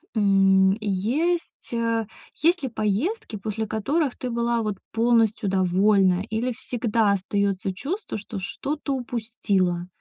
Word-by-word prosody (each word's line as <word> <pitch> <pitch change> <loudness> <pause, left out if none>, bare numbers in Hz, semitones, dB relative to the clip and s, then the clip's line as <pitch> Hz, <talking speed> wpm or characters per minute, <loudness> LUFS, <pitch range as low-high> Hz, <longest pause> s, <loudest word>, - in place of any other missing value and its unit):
м, 195 -2 +4
есть, 245 - -1
э, 230 -1 0 0.3
есть 340 +1 +2
ли 265 - -1
поездки, 230 - -1
после 215 +2 -3
которых 255 +7 -1
ты 255 - -4
была 235 0 0
вот 215 -2 -2 0.2
полностью 225 -2 +2
довольна 190 0 +3
или 230 +4 -1
всегда 230 -3 0
остается 195 0 0
чувство, 315 - -4
что 210 +1 -7
что-то 280 +9 -3
упустила? 210 -8 -1
220 Hz, 120 wpm, -24 LUFS, 195-245 Hz, 0.3 s, м